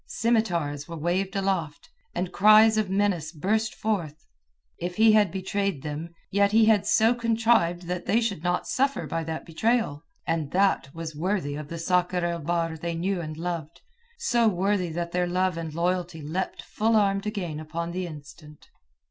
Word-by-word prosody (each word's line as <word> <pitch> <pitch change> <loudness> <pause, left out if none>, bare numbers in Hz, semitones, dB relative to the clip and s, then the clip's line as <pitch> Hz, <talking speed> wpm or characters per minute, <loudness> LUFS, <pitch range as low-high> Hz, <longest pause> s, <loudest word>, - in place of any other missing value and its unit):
Scimitars 170 -11 0
were 165 -1 -7
waved 185 +5 -1
aloft, 190 -6 -2 0.3
and 180 +1 -2
cries 215 +2 +7
of 215 -3 0
menace 190 -5 0
burst 215 +7 -1
forth. 170 -9 -3 0.5
If 175 +1 -4
he 220 +2 +6
had 210 -3 +4
betrayed 190 -4 -2
them, 150 +2 -5 0.2
yet 200 +1 +3
he 225 0 +6
had 215 -3 +3
so 225 +2 +4
contrived 225 -7 +2
that 180 +1 -4
they 225 - +3
should 215 -8 -2
not 175 0 0
suffer 275 +2 0
by 165 0 -3
that 160 0 -5
betrayal. 195 -3 0 0.2
And 165 -3 -1
that 190 -7 +2
was 165 -2 -6
worthy 175 -2 -1
of 150 0 -6
the 170 - -6
Sakr 180 +1 +1
el 170 0 -1
Bahr 165 +1 -1
they 170 +1 -3
knew 180 +2 -1
and 155 -1 -6
loved; 165 -2 -5 0.4
so 240 - +2
worthy 190 -2 +1
that 170 +1 -4
their 180 0 0
love 185 0 0
and 165 -1 -5
loyalty 175 0 -2
leapt 170 +6 -3
full 225 +1 0
armed 200 -1 +2
again 180 -8 -3
upon 165 +2 -4
the 180 0 -3
instant. 150 -1 -12
180 Hz, 175 wpm, -26 LUFS, 165-205 Hz, 0.5 s, cries